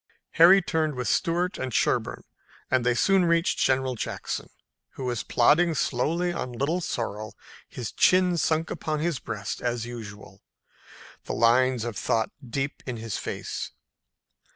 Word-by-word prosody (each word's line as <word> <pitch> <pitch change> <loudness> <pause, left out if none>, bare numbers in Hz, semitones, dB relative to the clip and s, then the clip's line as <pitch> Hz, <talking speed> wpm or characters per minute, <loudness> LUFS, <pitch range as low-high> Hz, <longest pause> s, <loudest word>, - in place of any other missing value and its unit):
Harry 175 +3 +7
turned 155 -3 0
with 125 -1 -3
Stuart 175 0 0
and 130 -1 -3
Sherburne - - 0 0.5
and 130 -2 +3
they 125 0 +2
soon 195 +8 +3
reached 170 0 +2
General 130 0 +2
Jackson, 120 - -4 0.4
who 130 - -6
was 120 -3 -1
plodding 160 +7 +3
slowly 165 +7 0
on 125 -7 -4
Little 145 +9 -1
Sorrel, 110 - -4 0.3
his 120 -4 -6
chin 185 -1 +4
sunk 160 -1 0
upon 155 -1 -2
his 160 -4 -1
breast 105 -1 -5
as 120 -1 -2
usual, 105 -4 -9 0.8
the - - -4
lines 125 +1 +3
of 120 -3 -4
thought 110 +5 0 0.2
deep 135 +4 -3
in 125 -2 -3
his 115 -2 -4
face. - - -5
130 Hz, 145 wpm, -26 LUFS, 120-165 Hz, 0.8 s, Harry